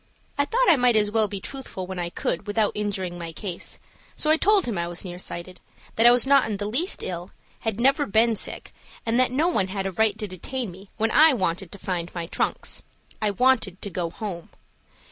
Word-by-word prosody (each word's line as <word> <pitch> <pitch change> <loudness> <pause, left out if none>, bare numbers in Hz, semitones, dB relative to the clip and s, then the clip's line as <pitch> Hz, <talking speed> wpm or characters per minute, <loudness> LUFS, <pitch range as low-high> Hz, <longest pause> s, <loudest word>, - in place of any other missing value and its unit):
I 285 - +2
thought - - +1
I 330 - +6
might 245 -2 +4
as 210 -1 +3
well 220 -1 +3
be 200 -1 -5
truthful 250 -5 -6
when 185 0 -6
I 175 -1 -2
could 175 +3 -3
without 205 0 +1
injuring 190 -4 -3
my 170 -1 -5
case, 175 +1 -5 0.4
so 305 - +2
I - - +6
told 405 +2 +3
him 235 - -2
I 170 -1 -1
was 175 +2 -4
near 175 -1 -6
sighted, 180 0 -6 0.4
that 225 +2 +6
I - - +9
was 245 0 +3
not 275 -1 +5
in 205 - -2
the 205 - -3
least 265 - +2
ill, 175 0 -4 0.3
had 225 -2 -3
never 275 +4 +3
been 225 +3 +3
sick, - - -6 0.3
and 230 +2 +2
that 255 - +4
no 295 +6 +2
one 205 - +1
had 195 0 -3
a 195 - -1
right 215 +2 +1
to 210 - -3
detain 210 +5 -4
me 190 +3 -14
when 220 0 +1
I 310 -2 +6
wanted 185 -3 -2
to - - -8
find 175 -3 -3
my 170 -1 -3
trunks. - - -1 0.4
I 215 - +2
wanted 210 -3 +2
to 200 - -5
go 170 -1 -2
home. 180 -3 -6
210 Hz, 225 wpm, -25 LUFS, 185-245 Hz, 0.4 s, I